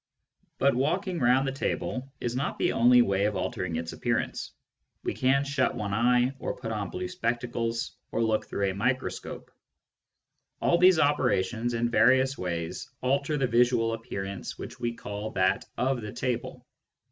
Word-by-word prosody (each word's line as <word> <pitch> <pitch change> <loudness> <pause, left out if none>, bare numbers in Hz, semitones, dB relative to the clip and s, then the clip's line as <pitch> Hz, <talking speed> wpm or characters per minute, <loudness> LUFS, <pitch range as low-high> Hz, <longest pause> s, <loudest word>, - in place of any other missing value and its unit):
But 140 +1 +3
walking 170 +8 0
round 125 +2 +3
the - - 0
table 135 0 -3
is 120 0 -2
not 135 +2 -2
the - - +1
only 125 +1 +6
way 100 -2 +1
of 105 -1 0
altering 90 -2 -2
its 80 +1 -4
appearance. - - -2 0.5
We - - -1
can 135 +2 +2
shut 140 -2 0
one 100 -2 -3
eye, 125 +3 +3
or - - -3
put 115 -3 -5
on 105 -3 -3
blue 90 0 -4
spectacles, 115 +2 -2 0.2
or 115 - 0
look 110 -1 0
through 100 -1 -1
a - - -5
microscope. 125 +7 -3 1.1
All 170 - +3
these 180 -1 +7
operations, 120 -6 +1
in 120 +1 0
various 130 +3 +4
ways, 85 -5 -4
alter 140 +3 +1
the 135 - +2
visual 120 -1 +3
appearance 100 -4 -5
which - - -8
we 120 - -1
call 105 0 -5
that 95 -1 +1
of 130 0 0
the 105 -1 -6
table. 125 0 -3
120 Hz, 160 wpm, -28 LUFS, 105-130 Hz, 1.1 s, these